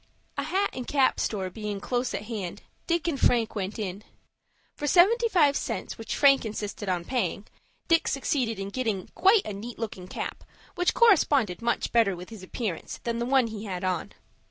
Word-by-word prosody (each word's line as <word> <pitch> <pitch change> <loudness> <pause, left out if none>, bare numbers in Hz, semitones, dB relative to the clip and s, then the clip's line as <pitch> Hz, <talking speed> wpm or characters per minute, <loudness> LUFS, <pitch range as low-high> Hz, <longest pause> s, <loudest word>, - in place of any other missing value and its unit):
A 280 - -1
hat 375 +8 0
and 250 -1 -6
cap 275 -3 +2
store 190 -4 -2
being 210 0 -4
close 245 +4 -1
at - - -4
hand, 210 -6 -5 0.2
Dick 340 -1 0
and 295 -5 -1
Frank 230 -2 +3
went 200 -1 -3
in. 200 -1 -4 0.7
For 295 - -4
seventy 435 - +5
five 300 -8 +4
cents, - - -3
which 225 - -4
Frank 275 -2 +5
insisted 210 -2 -4
on 175 -2 -1
paying, 240 -4 -1 0.4
Dick 330 -1 +3
succeeded 260 -5 0
in 195 0 -4
getting 220 -6 -2
quite 390 +2 +4
a 210 - -4
neat 225 +4 -7
looking 195 -5 -5
cap, - - -5 0.3
which 355 0 +1
corresponded 290 - +4
much 235 0 0
better 225 -5 +3
with 180 +1 -9
his 220 -4 -10
appearance 185 -2 -4
than 235 0 -2
the 235 - -1
one 265 -1 +4
he 220 -1 -6
had 185 -2 -4
on. 185 -2 -2
230 Hz, 185 wpm, -27 LUFS, 200-280 Hz, 0.7 s, seventy